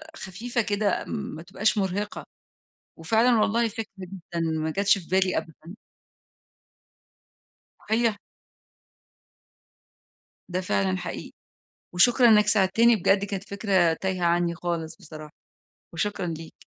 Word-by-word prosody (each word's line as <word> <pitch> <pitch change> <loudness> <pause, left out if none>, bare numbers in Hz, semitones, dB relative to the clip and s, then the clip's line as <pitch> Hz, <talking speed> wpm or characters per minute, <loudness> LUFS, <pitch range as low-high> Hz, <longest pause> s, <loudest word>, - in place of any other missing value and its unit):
خفيفة 235 +5 -3
كده 205 -2 -1
ما 205 -8 -5
تبقاش 200 +5 0
مُرهقة. 200 +1 -2 0.7
وفعلًا 225 +7 +3
والله 230 +2 +2
فكرة 225 0 -5
جدًا 180 -2 -7
ما 160 -1 -1
جاتش 195 +4 +2
في 175 - -12
بالي 185 0 +2
أبدًا. 160 +2 -9 2.2
هي 225 -1 +2 2.3
ده 180 0 -2
فعلًا 100 - 0
حقيقي. - - -6 0.6
وشكرًا 240 +7 +5
إنك 210 -2 +5
ساعدتني 215 +4 +4
بجد 200 0 +2
كانت 195 -1 -5
فكرة 190 -5 +2
تايهة 185 +1 -2
عني 170 0 +1
خالص 170 -2 -4
بصراحة 155 -1 -11 0.6
وشكرًا 190 +2 -2
ليك. 165 -1 -8
190 Hz, 105 wpm, -25 LUFS, 170-210 Hz, 2.3 s, وشكرًا